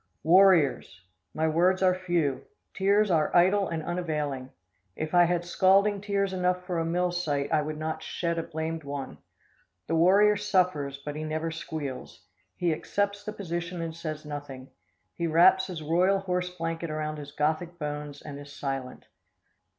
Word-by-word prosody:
Warriors! 170 - +4 0.3
My 160 +1 +1
words 180 +4 +2
are 185 -1 +5
few. 175 -7 -1 0.3
Tears 200 +1 +2
are 155 -3 +2
idle 190 +3 +4
and 160 -2 -3
unavailing. 150 -7 -3 0.5
If 155 +1 -4
I 175 0 +6
had 175 0 0
scalding 195 +3 +3
tears 200 -1 -1
enough 180 0 0
for 180 -2 -2
a 165 - -1
mill 175 +2 0
site, 150 -5 -2
I 155 - +4
would 155 +1 -4
not 155 0 -3
shed 170 -1 -2
a - - 0
blamed 160 0 -4
one. 140 -1 -6 0.7
The - - -3
warrior 200 +5 +5
suffers, 180 -9 0
but 145 +1 -7
he 155 - -4
never 155 +1 -2
squeals. 155 -4 -6 0.3
He 170 -2 +1
accepts 200 +5 -2
the 215 - -4
position 175 -2 -4
and 165 -1 -4
says 155 -2 -6
nothing. 145 -3 -8 0.4
He 170 - -2
wraps 175 +4 +5
his 170 -5 -6
royal 180 +5 +3
horse 180 -1 -1
blanket 165 -1 -4
around 155 0 -3
his 145 -1 -8
Gothic 160 +4 -1
bones 150 -2 -5
and 145 -2 -8
is 145 0 -11
silent. 135 -2 -5
165 Hz, 165 wpm, -27 LUFS, 150-180 Hz, 0.7 s, I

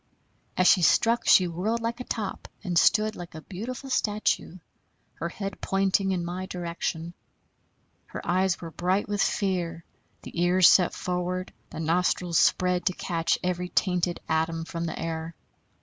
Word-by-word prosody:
As 185 - +3
she 185 - +6
struck 230 +8 +3
she 185 - +6
whirled 190 +7 -1
like 230 +1 -3
a - - -4
top 215 -5 -4 0.2
and 180 -3 -3
stood 215 +5 +4
like 175 -2 -9
a 160 - -7
beautiful 245 - -7
statue, 210 -5 0 0.6
her 170 - -4
head 195 +2 -6
pointing 195 0 +1
in 175 -2 -1
my 185 +2 -4
direction. 170 -1 -4 0.9
Her - - -8
eyes 185 +1 +1
were 165 -1 -8
bright 180 +5 0
with 205 -1 -1
fear, 175 -4 -1 0.4
the 170 - -5
ears 180 0 +5
set 180 -2 +5
forward, 180 +1 -3 0.2
the - - -8
nostrils 170 +1 +1
spread 180 -1 +2
to 185 - +2
catch 165 -2 -1
every 180 0 -2
tainted 180 -2 0
atom 165 +1 0
from 170 0 -4
the 165 - -4
air. 165 0 -4
180 Hz, 155 wpm, -26 LUFS, 170-195 Hz, 0.9 s, she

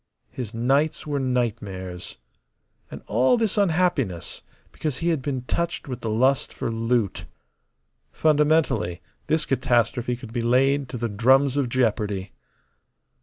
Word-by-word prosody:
His 120 -5 -6
nights 135 +7 +1
were 145 -2 -1
nightmares. 105 -8 -3 0.7
And - - -9
all 125 - +3
this 225 -3 0
unhappiness 160 - 0 0.3
because 150 -5 -3
he 170 - 0
had 160 -5 0
been 130 -2 -3
touched 170 +6 -2
with 125 -2 -5
the 115 - -3
lust 130 +5 +2
for - - -4
loot. 115 -2 -1 0.9
Fundamentally, 150 - +2 0.3
this 160 0 +1
catastrophe 120 -1 +1
could 120 -2 -11
be 120 - -1
laid 135 +3 +2
to 125 - -5
the 120 0 -1
drums 130 +6 +3
of 140 -4 0
jeopardy. 105 -6 0
125 Hz, 130 wpm, -24 LUFS, 115-145 Hz, 0.9 s, all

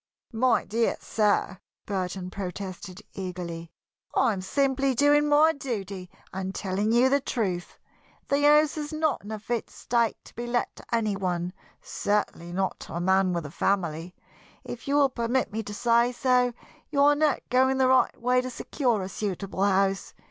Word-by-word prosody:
"My 235 +1 +2
dear 230 +2 0
sir!" 205 -3 0 0.3
Burton 185 -2 -3
protested, 190 +1 -6
eagerly. 175 -3 -6 0.4
"I 240 -4 +3
am 190 - -4
simply 270 +5 +1
doing 290 +3 +4
my 305 +2 +5
duty 200 - -5 0.2
and 190 +1 -4
telling 200 +3 -1
you 240 +3 +5
the 280 +2 +3
truth. 190 -10 -3 0.5
The 280 +1 +1
house 300 +1 +5
is 295 0 -5
not 310 -5 0
in 205 - -9
a 220 - -3
fit 225 +2 -3
state 235 -2 0
to - - -15
be 240 +1 -5
let 240 0 -1
to - - -11
any 220 -3 +1
one 180 -2 -2 0.3
certainly 205 -4 -2
not 190 +1 -1
to - - -8
a - - -1
man 190 +1 +3
with 170 -3 -2
a 145 - -7
family. 175 -2 -1 0.5
If 240 - -8
you 280 - +1
will 285 -2 +5
permit 245 0 -1
me 220 - -1
to 210 - -8
say 235 +1 +3
so, 250 0 +2 0.4
you 280 -2 +2
are 290 +1 +6
not 295 -1 +1
going 260 +1 +3
the 260 -1 +4
right 260 0 +3
way 250 +1 +2
to 255 - -5
secure 240 -4 -1
a - - -4
suitable 195 -1 -3
house. 195 -1 +1
220 Hz, 175 wpm, -27 LUFS, 190-260 Hz, 0.5 s, are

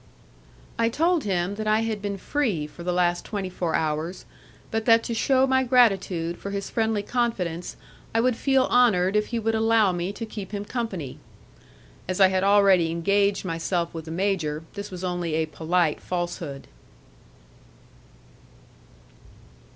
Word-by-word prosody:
I 230 0 +3
told 330 +4 +1
him 185 -1 0
that 215 0 -3
I 215 +1 +3
had 220 -2 -2
been 200 -1 -3
free 210 - -1
for 150 +3 -12
the 180 +1 -1
last 175 0 +1
twenty 195 -3 -4
four 175 -2 -2
hours, 160 +3 -2 0.5
but 225 0 -1
that 230 -1 +5
to 235 - -3
shew 260 +3 +3
my 260 0 +2
gratitude 195 -9 +2
for 200 - -6
his 200 0 -4
friendly 220 -2 0
confidence 195 -9 -2 0.3
I 225 - +1
would 250 +1 +2
feel 270 +1 +2
honoured 200 -6 +4
if 210 0 +2
he 235 - -3
would 225 0 0
allow 220 -2 +3
me 175 +1 -2
to 225 - -5
keep 210 -2 -8
him 205 0 -3
company. 205 - -4 0.9
As 185 +1 -2
I 190 -1 +7
had 190 0 0
already 195 -4 +5
engaged 200 +4 +1
myself 170 0 -2
with 160 -1 -7
the - - -9
major, 165 -4 -1
this 200 0 -6
was 185 -1 -8
only 175 -3 -2
a 160 0 +1
polite 160 +1 0
falsehood. 175 -6 -4
195 Hz, 160 wpm, -25 LUFS, 175-225 Hz, 0.9 s, I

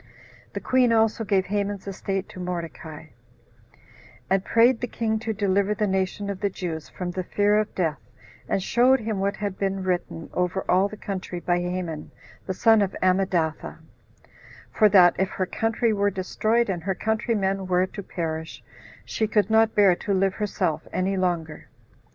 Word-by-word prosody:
The - - -3
queen 255 -2 +2
also 225 0 +2
gave 195 -3 +1
Haman's 200 0 -2
estate 195 0 -3
to - - -10
Mordecai; 165 -3 -6 1.2
and 190 0 +3
prayed 230 +3 +4
the 245 - -1
king 220 -1 -1
to 225 0 -3
deliver 200 0 +1
the 210 - 0
nation 190 +1 -1
of 195 - -6
the 200 0 0
Jews 165 -5 -5
from 180 -1 -5
the 185 - -3
fear 205 +3 +2
of 215 - -3
death, 160 -5 -1 0.5
and 190 - 0
showed 255 +5 +4
him 215 -2 -2
what 200 +1 0
had 200 -2 -4
been 195 -1 -1
written 180 -3 -3
over 180 +1 -1
all 185 +2 +3
the 210 +1 -10
country 190 -3 -5
by 175 0 0
Haman 175 -3 -4 0.4
the 190 - -1
son 225 +2 +5
of 195 -1 -1
Ammedatha; 185 -4 0 0.9
for 215 - +4
that 180 -3 +6
if 190 0 +1
her 185 - -2
country 225 +4 0
were 205 0 +2
destroyed, 215 +5 0
and 180 -4 -2
her 190 +2 -2
countrymen 205 -3 -1
were 180 0 +2
to 200 - -8
perish, 160 -4 -5 0.4
she 220 - -1
could 210 -1 +1
not 220 0 +4
bear 200 -4 +5
to 200 - -1
live 190 0 +2
herself 205 -7 -2
any 190 +1 0
longer. 175 -4 -2
195 Hz, 170 wpm, -25 LUFS, 180-210 Hz, 1.2 s, that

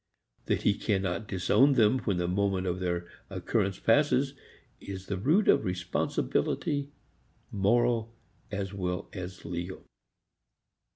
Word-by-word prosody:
That - - 0
he 105 - +4
cannot 95 -2 -1
disown 100 +10 +4
them 120 0 +4
when 100 -7 -1
the 90 0 0
moment 95 0 0
of 90 0 -1
their 85 -1 -2 0.2
occurrence 95 -1 -1
passes 135 +2 +3 0.5
is 95 -1 -7
the 100 - -2
root 155 - +2
of - - +5
responsibility, 90 - -1 0.6
moral 115 +3 +2 0.4
as 100 -1 -3
well 90 -2 -3
as 90 -2 -7
legal. 85 +2 -5
100 Hz, 120 wpm, -29 LUFS, 90-115 Hz, 0.6 s, of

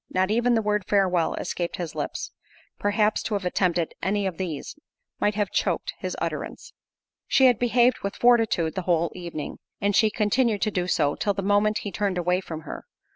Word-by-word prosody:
Not 185 +2 +1
even 240 +2 +3
the 225 - +1
word 210 -2 0
"Farewell," 185 -4 +2
escaped 175 -1 -3
his 170 -3 -5
lips—perhaps, 210 +1 -2
to 215 - -2
have 200 -2 -3
attempted 175 -2 0
any 200 +1 0
of 185 -4 -3
these, 170 -6 -4 0.4
might 205 0 +1
have 205 -2 -1
choaked - - -1
his - - -4
utterance. - - -5 0.5
She 265 - +4
had 245 -4 +5
behaved 245 +1 +3
with 200 - -4
fortitude 225 -9 +3
the 190 - -2
whole 170 -1 +2
evening, 170 -4 -6 0.2
and 205 -1 +1
she 220 - +5
continued 215 0 +1
to 215 - +1
do 180 -2 -1
so, 145 -5 +2
till 205 -1 -1
the 195 - -3
moment 205 +2 +2
he 205 - -4
turned 200 -3 -1
away 180 +1 +1
from 160 -4 -7
her. - - -8
200 Hz, 185 wpm, -25 LUFS, 180-215 Hz, 0.5 s, had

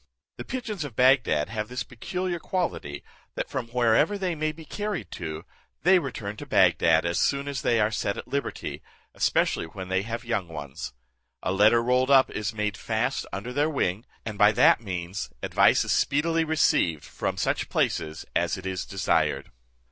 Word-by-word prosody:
The - - -5
pigeons 230 -9 -4
of 140 -6 -7
Bagdad 125 - +3
have 110 -1 -3
this 125 0 -3
peculiar 180 +8 -4
quality, 165 - -3 0.3
that - - -4
from 125 -3 -3
wherever 125 - +2
they 185 -3 -1
may 155 -1 -1
be 160 +1 -12
carried 205 - -4
to, 80 -2 -6 0.4
they 185 +3 +6
return 115 -9 -5
to 145 - -8
Bagdad 85 -6 +4
as 85 +1 0
soon 140 0 +1
as 140 -1 -3
they 120 -1 +2
are 105 0 +2
set 100 -2 -1
at - - -7
liberty, 140 0 -4 0.3
especially - - +1
when 95 +2 -8
they 95 0 +1
have 115 +3 -5
young 105 -6 -1
ones. 70 -6 -7 0.5
A - - 0
letter 110 +4 +5
rolled 125 +2 +2
up 135 -1 +6
is 105 0 -2
made 105 -2 -2
fast - - -1
under 110 +6 -5
their 145 +3 +2
wing, 105 - -1 0.2
and 110 -2 -5
by 105 +1 +7
that 110 - +5
means 90 - -4
advice - - +4
is - - -1
speedily 165 +3 +2
received 90 - +2
from - - -4
such - - -1
places 80 0 -1
as 85 -1 +1
it 95 - -9
is 95 -1 -3
desired. 95 -1 0
115 Hz, 180 wpm, -26 LUFS, 95-145 Hz, 0.5 s, by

